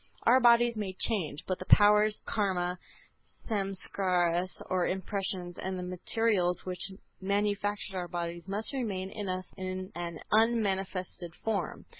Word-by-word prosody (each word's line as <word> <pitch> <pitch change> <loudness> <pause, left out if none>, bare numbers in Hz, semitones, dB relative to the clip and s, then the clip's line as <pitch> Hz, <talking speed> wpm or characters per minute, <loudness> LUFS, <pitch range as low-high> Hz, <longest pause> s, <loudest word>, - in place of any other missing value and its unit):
Our 250 +3 +6
bodies 240 -1 +5
may 200 -3 -3
change, 170 -11 -1
but 185 - -1
the 185 - -6
powers, 210 +1 +5
Karma, 180 -4 0 0.7
Samskaras 185 -3 +1
or 185 -2 +1
impressions 185 -2 -3
and 190 0 -3
the 180 - -4
materials 180 0 +1
which 185 +1 -2 0.3
manufactured 205 0 -1
our 180 -1 -2
bodies 170 0 -4
must 205 +7 -2
remain 195 -8 -2
in 210 -3 -4
us 185 0 -4
in 185 0 -4
an 170 -2 -5
unmanifested 195 -6 +1
form. 210 -5 -2
190 Hz, 130 wpm, -30 LUFS, 180-210 Hz, 0.7 s, Our